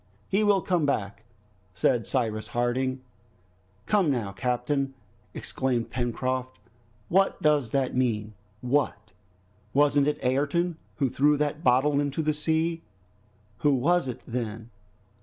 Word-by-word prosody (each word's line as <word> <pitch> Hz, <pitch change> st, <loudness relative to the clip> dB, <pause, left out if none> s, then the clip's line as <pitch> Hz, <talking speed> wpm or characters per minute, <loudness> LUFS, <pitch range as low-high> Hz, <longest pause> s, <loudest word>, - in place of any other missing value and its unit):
"He 200 Hz, +3 st, +2 dB
will 200 Hz, -4 st, +3 dB
come 180 Hz, -4 st, +1 dB
back," 100 Hz, -4 st, -2 dB, 0.5 s
said 115 Hz, +6 st, +1 dB
Cyrus 110 Hz, -5 st, -1 dB
Harding. 130 Hz, +2 st, -1 dB, 0.8 s
"Come, 200 Hz, -7 st, +2 dB
now, 115 Hz, -8 st, -1 dB
captain," 130 Hz, +5 st, -1 dB, 0.4 s
exclaimed 125 Hz, -3 st, -2 dB
Pencroft, 130 Hz, +1 st, -2 dB, 0.5 s
"what 195 Hz, +2 st, +2 dB
does 150 Hz, -6 st, +2 dB
that 135 Hz, 0 st, 0 dB
mean? 110 Hz, -4 st, 0 dB, 0.3 s
What! 125 Hz, -6 st, -1 dB, 0.6 s
wasn't 145 Hz, 0 st, +4 dB
it 150 Hz, 0 st, +1 dB
Ayrton 145 Hz, +7 st, +1 dB, 0.2 s
who 140 Hz, -, +1 dB
threw 145 Hz, +4 st, +3 dB
that 150 Hz, +2 st, -1 dB
bottle 135 Hz, +3 st, +3 dB
into 145 Hz, +2 st, -1 dB
the 155 Hz, 0 st, +1 dB
sea? 160 Hz, +2 st, 0 dB, 0.8 s
Who 145 Hz, +2 st, +3 dB
was 170 Hz, +5 st, +2 dB
it 125 Hz, -, -5 dB
then?" 115 Hz, -1 st, -5 dB
135 Hz, 120 wpm, -27 LUFS, 120-150 Hz, 0.8 s, wasn't